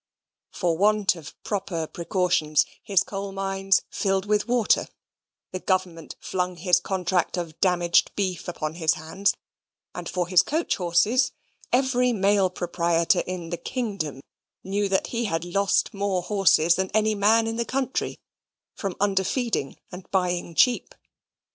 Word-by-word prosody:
For 170 -2 -1
want 210 -1 +3
of 155 -4 -11
proper 185 -5 -2
precautions, 170 -3 +1 0.2
his 195 -4 +2
coal 200 0 -5
mines 195 0 +1
filled 195 -1 0
with 210 +1 +1
water: 240 -3 +2 0.6
the 185 - -4
government 180 -4 -2
flung 180 -1 -2
his 175 +1 +3
contract 180 -1 -1
of 170 -3 -5
damaged 175 -2 +3
beef 185 -3 -2
upon 155 -3 -4
his 160 -2 +1
hands: 165 +6 -1 0.6
and - - -6
for 180 -2 -1
his 180 -1 +5
coach 320 +3 -1
horses, 200 +9 +2 0.4
every 250 -1 +2
mail 200 -2 +3
proprietor 170 -2 +1
in 180 -2 -5
the 175 - -2
kingdom 195 - -4 0.4
knew 200 +1 -1
that 190 - +1
he 230 -2 -1
lost 195 +3 +1
more 200 -2 -1
horses 180 -4 +4
than 190 +1 -1
any 215 0 +3
man 215 +2 +3
in 225 0 -3
the 235 - +1
country, 260 +1 -2 0.6
from 195 -3 -4
underfeeding 200 - 0
and 180 0 -10
buying 180 -3 -1
cheap. 250 +6 +2
190 Hz, 140 wpm, -25 LUFS, 175-205 Hz, 0.6 s, his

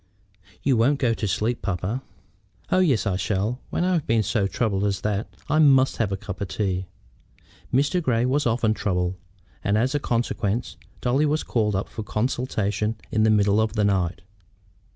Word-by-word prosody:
"You 135 -3 +3
won't 135 +6 +3
go 125 -4 +2
to 110 - -2
sleep, 110 +6 -1
papa?" 100 +6 -2 0.7
"Oh 185 - +4
yes, 145 -13 +2
I 95 -3 0
shall. 100 +5 -1
When - - -1
I've 180 -4 +1
been 110 -1 +3
so 100 -1 +1
troubled 100 0 -1
as 100 -2 0
that 105 0 -1 0.2
I 155 +2 +2
must 135 -3 +5
have 110 -4 0
a 95 - -1
cup 100 -1 -7
of 100 - -1
tea." 95 -2 -2 0.8
Mr. 145 +8 +2
Grey 125 -6 +1
was 135 +1 +1
often 115 -1 +2
troubled, 90 -4 -1 0.5
and 100 +1 +2
as 125 +5 +1
a 145 - +1
consequence 115 - -1 0.3
Dolly 135 +5 +2
was 155 +2 0
called 105 -4 0
up 95 - -1
for 110 - -7
consultations 105 -2 -1 0.2
in 110 - +1
the 110 - +4
middle 105 0 +4
of 110 0 0
the 105 -2 +1
night. 90 -4 0
110 Hz, 180 wpm, -24 LUFS, 100-130 Hz, 0.8 s, must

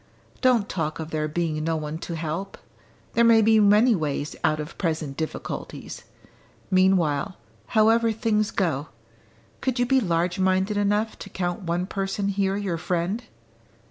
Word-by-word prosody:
"Don't 245 -5 +3
talk 160 -3 -2
of 160 0 -6
there 155 -1 -1
being 155 -1 -2
no 165 0 0
one 155 0 -4
to 170 - -5
help! 165 +4 -4 0.6
There 235 - +4
may 230 -1 +6
be 220 0 +5
many 210 +4 +5
ways 150 -4 -2
out 155 0 +2
of 150 +1 -6
present 155 -5 -2
difficulties. 160 +1 -6 0.7
Meanwhile, 185 -4 +2 0.3
however 225 +1 +4
things 215 -1 0
go, 155 -6 -1 0.7
could 260 -1 -1
you 245 - +2
be 265 +2 +3
large 175 -3 0
minded 190 +2 +2
enough 205 +2 0
to 195 - -8
count 175 0 -3
one 175 0 -1
person 195 +1 -2
here 195 0 0
your 190 -5 -2
friend?" 180 +7 -2
185 Hz, 150 wpm, -25 LUFS, 160-210 Hz, 0.7 s, may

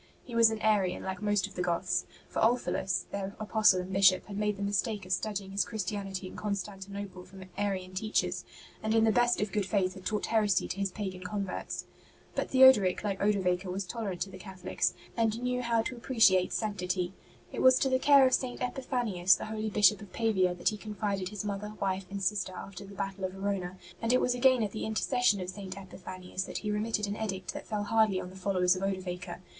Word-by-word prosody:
He 245 - -11
was 230 -1 +6
an 220 -1 -3
Arian 200 -4 +2
like 190 +1 -4
most 205 -2 +1
of 200 - -10
the 180 - -3
Goths; 180 +1 0 0.2
for - - -4
Ulfilas, 225 -5 +1
their 200 0 -4
apostle 215 -3 +4
and 185 +1 -7
Bishop, 190 -1 +5
had 200 - -8
made 210 0 0
the 200 - -4
mistake 205 0 -1
of 185 - -9
studying 195 0 -2
his 200 +1 +1
Christianity 195 -2 -4
in 185 - -8
Constantinople 200 -2 -5
from 190 +1 -12
Arian 190 -2 -2
teachers, 215 +3 -1 0.4
and 220 +1 0
in 225 - +5
the 225 - +5
best 240 +2 +3
of 210 -1 -1
good 205 -2 -1
faith 190 -2 +1
had 190 - -11
taught 210 +1 -1
heresy 210 -4 +2
to 195 - -4
his 200 -1 0
pagan 185 -1 -5
converts. 195 0 -4 0.5
But - - -2
Theodoric, 260 -10 +6
like 200 -2 -2
Odovaker, 185 -3 +1
was 190 +1 -3
tolerant 195 -2 -4
to 195 - -2
the 185 - -10
Catholics, 185 -1 -2 0.2
and 225 -1 +1
knew 250 0 -1
how 230 -2 +1
to 250 - -4
appreciate 225 -7 +4
26 - - -3
ST. - - 0
BENEDICT 210 -3 -3
sanctity. 180 0 -1 0.4
It - - -2
was 260 0 +7
to 275 - +2
the 260 0 +2
care 275 0 +7
of 255 - +2
St. 250 -2 0
Epiphanius, 240 -8 +1
the - - -5
holy 215 0 -3
Bishop 210 -1 +4
of 205 -3 -11
Pavia, 190 -6 +1
that 175 - +1
he 215 - -5
confided 205 -3 -3
his 210 0 -5
mother, 205 +1 -4
wife 190 -1 -1
and 200 0 -5
sister 190 -1 0
after 200 +1 -8
the 200 - -11
battle 195 0 -4
of 185 - -4
Verona; 195 -2 -3 0.2
and 230 +1 +1
it 255 - +5
was 250 - +2
again 250 -1 +4
at 205 - -2
the 215 - -5
inter 220 0 -1
cession 245 -6 +2
of 180 0 -4
St. 190 0 -8
Epiphanius 185 -1 -6
that - - -5
he 210 - -3
remitted 210 0 0
an 205 0 -3
edict 195 -4 -4
that - - -8
fell 210 -1 -2
hardly 215 -2 +3
on 180 - -7
the - - -13
followers 185 -1 +2
of 185 - -5
Odovaker. 185 -2 -4
200 Hz, 225 wpm, -30 LUFS, 185-220 Hz, 0.5 s, was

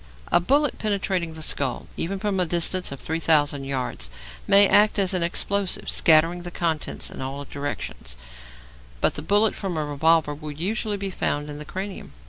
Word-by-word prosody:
A - - +5
bullet 280 +10 +1
penetrating 190 -5 -1
the 160 - -5
skull 135 -4 -1
even 195 +4 -2
from 195 -1 -1
a 180 - +3
distance 175 +1 +1
of 140 - -7
3,000 150 -3 +1
yards 130 - -3 0.4
may 200 0 +8
act 210 +2 +4
as 195 -2 +3
an 180 - 0
explosive, 190 +3 -1
scattering 165 +2 +4
the 175 - -6
contents 165 -3 -2
in - - -8
all 135 +2 -5
directions; 140 - -6 0.8
but - - +2
the - - -5
bullet 205 +2 +2
from 190 -5 -4
a 155 - -1
revolver 150 +1 +2
will 150 +1 -7
usually 205 +7 -2
be 195 -1 -3
found 145 -4 -2
in 145 - -8
the 150 - -8
cranium. 190 - -7
170 Hz, 175 wpm, -24 LUFS, 145-195 Hz, 0.8 s, may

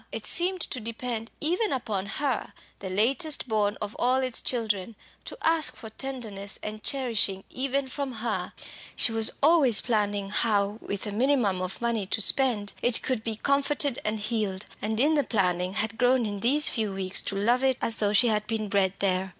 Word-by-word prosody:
It - - -6
seemed 360 +1 +2
to 260 - -3
depend 230 0 -5
even 360 +8 0
upon 210 -7 -2
her, 265 +2 -2 0.3
the 190 - -6
latest 265 - +1
born 210 -2 0
of 210 0 -5
all 250 +1 +3
its 260 -2 0
children 220 -4 -1 0.3
to - - -7
ask 325 -2 +3
for 220 -2 -10
tendance 220 -6 -6
and 215 0 -6
cherishing 225 -8 0
even 275 +1 -1
from 275 0 -5
her. 225 -1 -3 0.4
She - - +4
was 225 -1 +5
always 285 -8 +5
planning 205 -3 -1
how 210 -1 +1
with 200 +1 -4
a 210 - -4
minimum 225 -5 +1
of 185 +4 -5
money 230 -4 -1
to 220 - 0
spend 215 -2 +2
it 245 -1 +1
could 250 -4 -1
be 225 -1 -3
comforted 280 +2 0
and 215 0 -2
healed, 210 -3 -3 0.2
and 220 +1 -2
in 295 +5 +4
the 290 -2 +2
planning 180 -5 0
had 220 +1 -1
grown 250 -1 +3
in 205 -1 -4
these 280 +8 +5
few 215 -4 -1
weeks 190 0 0
to 200 - -3
love 235 +6 +1
it 265 -1 +2
as 225 - 0
though 205 -1 +1
she 215 +4 +4
had 210 -1 -1
been 220 -2 -3
bred 195 -2 +1
there. 190 -1 0
225 Hz, 190 wpm, -26 LUFS, 205-260 Hz, 0.4 s, was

